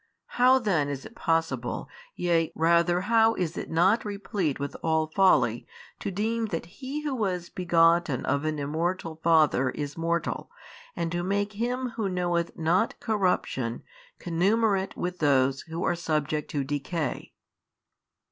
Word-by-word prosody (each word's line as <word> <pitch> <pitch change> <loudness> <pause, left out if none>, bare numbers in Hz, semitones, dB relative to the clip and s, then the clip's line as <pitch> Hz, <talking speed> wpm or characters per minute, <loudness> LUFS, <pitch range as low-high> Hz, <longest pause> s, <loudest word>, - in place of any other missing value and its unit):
How 255 +1 +7
then 180 - +1
is 140 -2 -5
it - - -11
possible 165 -7 -1 0.3
yea, 165 -2 +1
rather 170 +2 +3
how 225 +2 +3
is 175 -2 -2
it - - -5
not 185 +8 +3
replete 200 -7 -2
with 140 0 -4
all 160 -1 +1
folly, 190 +4 +2 0.3
to - - -3
deem 220 +4 -1
that 165 -5 -4 0.2
He 280 +3 -4
who 295 -2 -2
was 185 -7 -2
begotten 170 -5 +2
of 140 +2 0
an 155 -1 -1
Immortal 160 +3 -2
Father 155 -6 +4
is 145 +3 -5
mortal 170 +1 -2 0.5
and 165 - -2
to 175 0 -1
make 200 +3 -1
Him 245 +4 -2
who 210 -4 0
knoweth 175 -2 -1
not 170 +8 +1
corruption 180 - -1 0.4
connumerate 195 +3 +1
with 180 0 -3
those 135 -2 +2
who 165 +2 -5
are - - +2
subject 155 -3 -2
to 145 -2 -1
decay? 145 +2 -3
170 Hz, 145 wpm, -27 LUFS, 155-200 Hz, 0.5 s, How